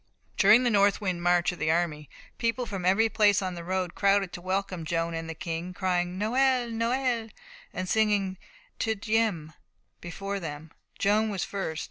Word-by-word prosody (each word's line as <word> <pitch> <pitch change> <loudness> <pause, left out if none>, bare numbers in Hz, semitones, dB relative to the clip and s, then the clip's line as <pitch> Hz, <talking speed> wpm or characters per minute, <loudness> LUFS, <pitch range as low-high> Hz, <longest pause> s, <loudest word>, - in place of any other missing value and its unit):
During 215 +5 +6
the 240 - +2
northward 200 -2 +2
march 175 +1 +2
of 180 - -10
the 155 - 0
army, 160 -3 0 0.3
people 235 +1 0
from 195 -5 -5
every 195 +5 +4
place 205 -2 +3
on 185 -2 -3
the 170 -1 -7
road 185 0 -2
crowded 200 -2 +2
to 175 - -7
welcome 185 -1 -2
Joan 165 +1 -1
and 165 0 -5
the 165 - -5
King, 170 +2 -5
crying, 180 -1 -1
Noël, 245 +2 +1
Noël, 235 0 0 0.4
and 185 0 -4
singing 205 -3 +1 0.4
Te 220 -1 0
Deums 210 -7 -1 0.5
before 195 +3 -5
them. 155 -2 -7 0.3
Joan 215 +2 +2
was 195 -3 -2
first. 175 -6 -4
190 Hz, 165 wpm, -27 LUFS, 175-215 Hz, 0.5 s, During